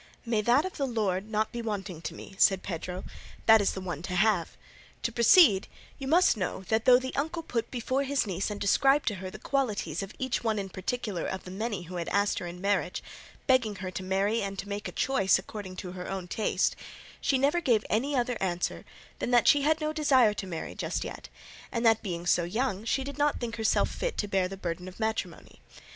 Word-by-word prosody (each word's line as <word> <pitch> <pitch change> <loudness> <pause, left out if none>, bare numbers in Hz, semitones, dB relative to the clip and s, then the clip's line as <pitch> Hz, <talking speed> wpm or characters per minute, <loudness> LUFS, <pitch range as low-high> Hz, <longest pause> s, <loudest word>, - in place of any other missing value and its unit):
"May 230 -2 +1
that 245 - +3
of 375 - -6
the 280 -3 0
Lord 210 -4 -1
not 215 0 0
be 235 - -4
wanting 200 -6 -4
to - - -5
me," - - -10
said 195 -2 +4
Pedro; 180 +1 -5 0.4
"that 220 -1 +7
is 200 - +1
the 190 - -5
one 175 -5 -4
to 180 +1 -4
have. 195 -3 +2 0.5
To 235 - 0
proceed; 235 - +6 0.3
you 270 - -5
must 340 +2 +5
know 190 -2 -3
that 220 0 +1
though 250 -1 +8
the 260 +1 -4
uncle 320 +4 -2
put 235 -7 -2
before 255 +2 -1
his 280 -2 0
niece 195 0 -2
and 205 -1 -5
described 270 +8 +3
to 210 - -4
her 185 - -5
the - - -9
qualities 220 - -1
of 195 +1 -7
each 260 -2 -2
one 220 -2 +1
in 195 -1 -3
particular 195 -1 -3
of 190 - -4
the 180 - -9
many 205 -1 -3
who 180 +1 -7
had 170 - -3
asked 200 0 +1
her 175 - -5
in 175 +1 -8
marriage, 195 -2 0 0.4
begging 250 -6 +3
her 185 -1 -5
to 185 - -5
marry 195 +4 +1
and 195 0 -4
make 200 0 -4
a - - -6
choice 265 -8 +2
according 190 -1 -7
to 180 0 -6
her 180 0 -7
own 190 -2 -4
taste, 215 +4 0 0.5
she 270 - +2
never 290 +6 +2
gave 235 -8 +2
any 270 +7 0
other 245 -1 0
answer 180 -2 -2 0.3
than - - -2
that 245 -1 +4
she 290 - +6
had 310 +2 +2
no 305 0 -1
desire 265 -8 +4
to 200 -2 -5
marry 165 -3 -5
just - - -3
yet, - - -8 0.4
and 235 -1 -1
that 225 -1 +5
being 175 -4 -4
so 175 0 +3
young 210 +3 -1
she 265 +4 0
did 280 +2 -7
not 290 0 +2
think 230 -2 -4
herself 220 -1 +2
fit - - -3
to 205 - -1
bear 190 -2 +1
the 195 +1 -8
burden 180 0 -4
of 185 +2 -11
matrimony. 220 0 -3
215 Hz, 225 wpm, -29 LUFS, 190-255 Hz, 0.5 s, though